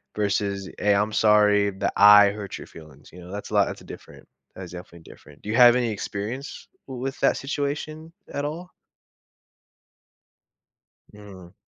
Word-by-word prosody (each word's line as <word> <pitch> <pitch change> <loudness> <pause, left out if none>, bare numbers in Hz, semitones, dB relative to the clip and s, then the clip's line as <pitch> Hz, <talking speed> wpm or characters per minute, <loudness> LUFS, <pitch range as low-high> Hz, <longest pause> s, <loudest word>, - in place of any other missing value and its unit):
versus, 100 -2 -2
"Hey, 105 0 +2
I'm 105 +1 0
sorry 105 -1 +3
that 100 +1 -3
I 105 0 +7
hurt 100 -1 -7
your - - -11
feelings," 75 -3 -16
you 90 - -12
know, 90 +2 -12
that's 105 0 -7
a - - -7
lot - - +3
it's - - -8
a - - -15
different. - - -13 0.3
That's 90 -2 -9
definitely 85 -2 -12
different. 75 0 -17
Do 105 - -9
you 110 - -1
have 120 -1 +7
any 120 -2 0
experience 110 +6 -6 0.2
w 130 -2 -8
with 135 +1 -4
that - - +2
situation 150 +3 -5 0.2
at 145 - -3
all? 165 +5 -6 2.4
Mm. 100 -3 -14
105 Hz, 165 wpm, -24 LUFS, 100-125 Hz, 2.4 s, I